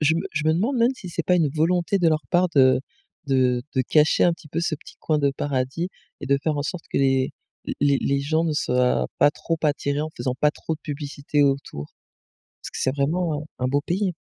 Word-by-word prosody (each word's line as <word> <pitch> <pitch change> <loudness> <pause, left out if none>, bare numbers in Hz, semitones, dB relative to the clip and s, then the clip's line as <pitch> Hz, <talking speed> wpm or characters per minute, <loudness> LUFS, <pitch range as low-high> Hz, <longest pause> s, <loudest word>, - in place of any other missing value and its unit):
Je 155 +1 +3
me - - 0
je 155 0 -1
me 155 - +4
demande 225 +11 0
même 240 +2 +3
si 185 - -9
c'est 170 - -2
pas 180 - +3
une 165 -4 +3
volonté 175 +6 +1
de 175 -3 +4
leur 155 -1 +1
part 180 +1 +3
de 130 -2 +5 0.5
de 125 -2 +2
de 130 - +2
cacher 150 +4 +3
un 175 - +4
petit 165 -2 -11
peu 160 +3 -2
ce 170 -1 0
petit 150 - -14
coin 155 -1 +1
de 140 -1 +2
paradis 140 +4 -2 0.3
et - - -6
de 140 +1 +3
faire 155 -2 0
en 145 - -1
sorte 170 +3 -5
que - - -1
les 135 -1 +2 0.5
les 140 -1 +3
les 140 0 +1
gens 155 +3 +1
ne 160 - 0
soient 125 -3 +1
pas 145 - +6
trop 165 +2 -3
attirés 145 -1 0
en 155 - -3
faisant 125 -2 -2
pas 150 - +4
trop 160 - -4
de 155 - -14
publicité 145 0 -2
autour 135 - -1 0.7
parce - - -7
que - - -7
c'est 130 +1 0
vraiment 155 +1 0 0.2
un 125 - 0
un - - +2
beau 140 +2 +1
pays. 185 +4 -1
150 Hz, 235 wpm, -24 LUFS, 140-165 Hz, 0.7 s, pas